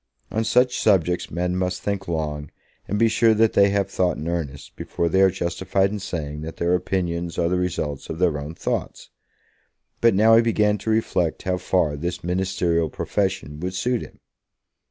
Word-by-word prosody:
On 110 +3 0
such 125 +3 +2
subjects 90 -4 +2
men 90 +1 -1
must 90 -1 -2
think 100 -1 -2
long, 75 -3 -3 0.4
and 105 - -1
be 115 +2 +4
sure 115 0 +3
that 110 0 +3
they 100 0 +5
have 100 0 +1
thought 90 -2 0
in 80 - -5
earnest, 75 -5 -4
before 85 - -2
they 95 +3 +2
are 95 - +6
justified 95 +2 0
in 105 - -3
saying 75 -6 -5
that 80 +1 -7
their 85 +1 +1
opinions 85 -2 -1
are 85 - +2
the 90 0 +1
results 75 -6 -3
of 80 - -4
their 85 -4 +1
own 75 +3 -7
thoughts. - - -4 0.9
But 115 -4 +5
now 110 +3 +6
he 115 - +7
began 105 -3 +2
to 110 - -4
reflect 95 -7 0
how 90 -1 0
far 90 -4 +1
this 85 +4 -4
ministerial 90 -2 0
profession 75 -9 -2
would 90 +2 -4
suit 120 +4 0
him. - - -11
90 Hz, 185 wpm, -23 LUFS, 85-100 Hz, 0.9 s, he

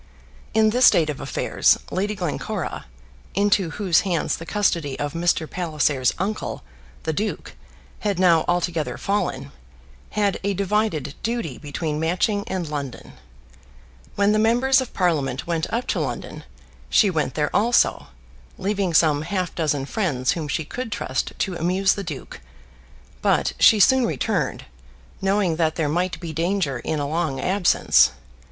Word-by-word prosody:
In 220 -1 +4
this 250 +2 +4
state 155 -3 +4
of 145 - -8
affairs - - +2
Lady 205 +3 -1
Glencora, 175 - -4 0.5
into 200 -2 +2
whose 180 -1 +2
hands 175 -5 -1
the 165 - -9
custody 170 -9 0
of 145 0 -3
Mr. 170 -1 +1
Palliser's 150 -7 0
uncle, 205 +4 -3 0.4
the 160 - -1
duke, 210 +7 -3 0.5
had 205 -3 -1
now 175 -3 +4
altogether 175 -3 -1
fallen, 140 -9 -2 0.7
had 205 -2 +1
a 200 0 0
divided 195 -7 0
duty 220 - -3
between 150 +1 -3
Matching 185 +5 0
and 185 -3 -3
London. 140 -4 -6 1.0
When 200 +1 +3
the 215 - +2
members 245 +4 +3
of 255 - -6
Parliament 145 -8 0
went 165 -2 -2
up 235 +2 -1
to - - 0
London, - - -5 0.4
she 205 -4 +4
went 155 -6 -1
there 150 -1 -1
also, 235 +3 +2 0.5
leaving 195 -3 -1
some 150 -3 +4
half 180 +2 -2
dozen 145 -4 -1
friends 140 - 0
whom 160 -3 -3
she 150 +2 -2
could 245 - -6
trust 130 -9 -2
to 190 - -1
amuse 185 +4 +2
the 200 - -5
duke; 150 - -8 0.8
but - - +2
she 220 - +7
soon 260 +3 +5
returned, 150 -6 -2 0.6
knowing 195 -4 +1
that 160 -2 +1
there 160 -3 0
might 175 +4 -1
be 165 -3 -6
danger 165 -5 -1
in 155 - -2
a 145 - -2
long 155 -3 -1
absence. 180 - +3
175 Hz, 145 wpm, -23 LUFS, 155-200 Hz, 1.0 s, she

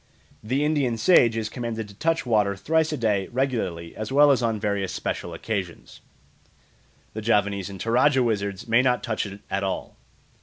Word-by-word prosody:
The 130 +7 0
Indian 140 -6 +1
sage 120 -5 +4
is 110 -1 -2
commanded 115 -1 -5
to 100 - -13
touch 160 +9 -1
water 105 -4 +2
thrice 160 +9 +1
a 150 - -2
day 105 -5 0
regularly 110 -11 -2
as 110 +2 -5
well 145 +1 +6
as 130 - +2
on 115 -2 0
various 100 -3 -1
special 85 - -4
occasions; 90 0 -5 1.1
the 110 - -5
Javanese 100 -3 +1
and 95 -1 -9
Toradja 125 +5 +3
wizards 100 -4 -2
may 115 +2 +4
not 125 -1 +1
touch 110 -3 -2
it 100 0 -10
at 100 0 -1
all. 95 - -4
110 Hz, 175 wpm, -24 LUFS, 100-125 Hz, 1.1 s, well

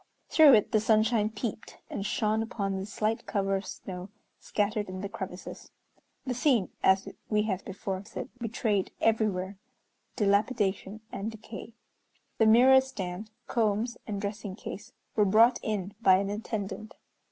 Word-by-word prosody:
Through 300 -5 +8
it 210 - +2
the 215 - +4
sunshine 215 0 +3
peeped, 220 0 -5
and 195 - -4
shone 215 +1 0
upon 200 -4 -2
the 190 +1 -4
slight 215 +2 -2
cover 195 -2 0
of 195 - -7
snow 180 0 -7 0.3
scattered 210 -1 -1
in 185 0 -5
the 200 - -3
crevices. 190 -4 -7 0.6
The 255 - -1
scene, 245 -5 +2
as 190 +1 +4 0.2
we 210 -1 +2
have 195 -3 -2
before 190 0 -4
said, 220 +3 -7
betrayed 220 -4 0
everywhere 205 -4 +1 0.6
dilapidation 205 -1 +1
and 200 +2 -3
decay. 225 +1 -9 0.7
The 225 - +5
mirror 255 +4 +7
stand, 205 -5 -6 0.2
combs, 225 +1 0
and 205 -2 -3
dressing 200 -1 -4
case 210 0 -8 0.2
were 210 - +4
brought 225 +5 +5
in 205 -3 -3
by 190 -4 +7
an 200 +1 -1
attendant. 215 0 -5
210 Hz, 145 wpm, -29 LUFS, 195-225 Hz, 0.7 s, Through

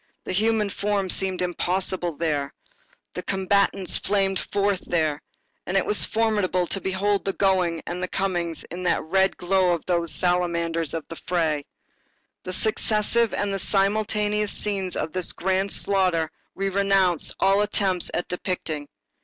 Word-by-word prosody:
The - - -5
human 210 +1 +1
form 200 -2 0
seemed 190 -1 +1
impossible 180 0 -1
there, 145 -4 -1 0.6
the - - -4
combatants 195 -1 +2
flamed 195 -1 +1
forth 200 -1 +1
there, 155 -3 0 0.5
and 185 - +1
it 190 - +2
was 210 - +3
formidable 210 -5 +1
to 195 +3 -3
behold 195 +2 0
the 195 - -1
going 185 -4 +1
and 180 +1 -4
coming 175 -4 -1 0.2
in 175 +2 -5
that 180 -1 +1
red 190 +4 +2
glow 180 0 +2
of 170 - -4
those 170 -3 0
salamanders 170 -1 0
of 160 - -5
the 165 - -9
fray. 160 -5 0 0.8
The 185 - -3
successive 220 +3 +1
and 200 -1 -1
simultaneous 210 +1 +1
scenes 195 -3 -1
of 160 - -3
this 185 -2 -1
grand 190 +1 0
slaughter 185 -5 +1 0.2
we 195 0 -1
renounce 195 -3 +2
all 195 +1 +4
attempts 190 -3 +1
at 175 - -2
depicting. 165 -5 -3
190 Hz, 145 wpm, -24 LUFS, 175-200 Hz, 0.8 s, all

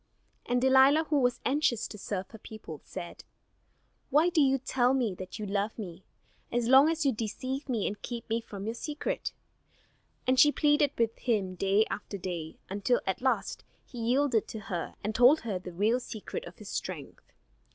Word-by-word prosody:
And 245 0 +2
Delilah, 265 +4 +6
who 295 - +4
was 245 -2 +1
anxious 260 -5 +1
to - - -10
serve 195 -2 -5
her 220 - -11
people, 205 -10 -9
said: 175 - -8 0.9
"Why 310 +5 +4
do 340 -3 +3
you 270 -1 +4
tell 255 -1 +1
me 240 -7 0
that 185 +2 -8
you 215 - -4
love 205 +2 -1
me, 190 -4 -7 0.5
as 240 -1 0
long 265 +4 +7
as 325 -2 -1
you 275 - +4
deceive 255 +5 -4
me 230 -5 0
and 205 - -3
keep 235 -2 -5 0.2
from 200 -3 -8
me 215 - -2
your - - -2
secret?" 295 +5 -3 0.9
And 255 0 +3
she 295 - +8
pleaded 295 -1 +3
with 230 -1 +1
him 205 -6 0
day 195 +4 +2
after 200 - -5
day, 175 -4 -5
until 205 +5 +1
at 190 +3 -2
last 260 0 0 0.2
he 245 - -10
yielded 240 0 +2
to 220 - -6
her 175 -2 -3
and 215 - -2
told 250 +7 +6
her 205 -5 -3
the 180 0 -8
real 210 +8 +2
secret 250 - -6
of - - -12
his - - -10
strength. - - -6
235 Hz, 185 wpm, -29 LUFS, 205-265 Hz, 0.9 s, she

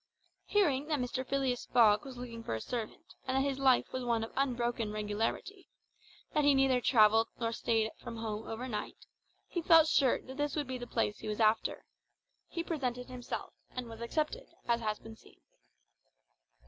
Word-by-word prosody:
Hearing 300 -9 +2
that 305 -2 +1
Mr. 255 0 -2
Phileas 265 -2 -1
Fogg 215 -2 +5
was 265 -2 -8
looking 235 -2 -7
for 115 - -2
a - - -3
servant, 230 - -6
and 260 +1 +1
that 270 +1 +2
his 275 -1 -2
life 265 -2 +3
was 255 -1 -2
one 235 -2 +1
of 225 - -6
unbroken 240 -4 0
regularity, 215 - -3 0.6
that 300 - +3
he 285 -1 +5
neither 265 -2 +3
travelled 225 -2 +5
nor 230 -1 0
stayed 225 -1 0
from 235 -1 -7
home 220 -1 -4
overnight, 225 -2 -5 0.4
he 345 - -3
felt 330 -1 +7
sure 270 -5 +3
that 260 +1 -10
this 290 0 -1
would 295 -2 -1
be 255 -1 -5
the 245 - -6
place 225 -3 -1
he - - -7
was 210 +1 -3
after. 220 0 +2 0.6
He 335 - -4
presented 250 -7 -3
himself, 250 -1 -6 0.2
and 250 -1 -6
was 225 0 -10
accepted, 310 - -2 0.2
as 235 -1 +2
has 215 -1 -1
been 225 0 -11
seen. - - -20
245 Hz, 180 wpm, -32 LUFS, 225-275 Hz, 0.6 s, felt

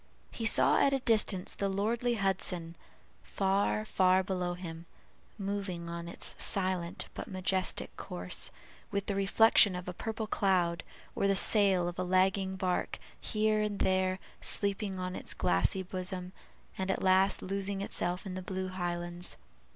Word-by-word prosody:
He 225 - -1
saw - - +5
at 275 - +4
a 270 - +2
distance 210 -6 +1
the 200 - -1
lordly 225 +5 0
Hudson, 185 -4 -1 0.5
far, 200 +2 0
far 185 -2 +3
below 180 -2 -2
him, 170 -2 -8 0.5
moving 195 -4 -4
on 170 0 -5
its 170 - 0
silent 185 -3 +1
but - - -6
majestic 185 -2 -1
course, 90 0 -4 0.4
with 200 -1 -2
the 200 - -1
reflection 200 0 +5
of 180 0 -6
a 180 - -4
purple 220 +4 -4
cloud, 180 -5 +1 0.3
or 200 - +1
the 195 - +3
sail 195 -4 +4
of 175 0 -5
a - - +1
lagging 190 +1 +2
bark, 185 -1 -1 0.2
here 215 -1 +1
and 210 -1 -1
there 185 -1 +1 0.2
sleeping 200 -1 0
on 185 0 -4
its - - -3
glassy 90 - +1
bosom 185 0 -5 0.5
and 190 0 -2
at 190 - -1
last 190 +1 +3
losing 195 +1 -2
itself 180 -1 -2
in 190 - -5
the 185 - -4
blue 185 0 -4
highlands. 175 -1 -2
190 Hz, 150 wpm, -31 LUFS, 180-200 Hz, 0.5 s, saw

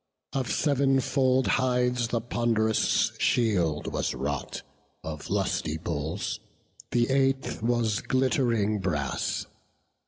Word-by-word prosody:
Of 130 -4 -1
sev'n 140 -2 +2
fold 130 0 +2
hides 125 -1 +1
the 115 0 -1
pond'rous 115 -2 +1
shield 90 -10 +1
was - - -1
wrought - - -4 0.4
Of 75 -2 -6
lusty 80 +1 -1
bulls; 80 -1 -3 0.5
the 120 +1 +1
eighth 135 -2 +1
was 115 -2 +1
glitt'ring 120 -5 +1
brass. 75 -8 -2
120 Hz, 100 wpm, -27 LUFS, 100-130 Hz, 0.5 s, sev'n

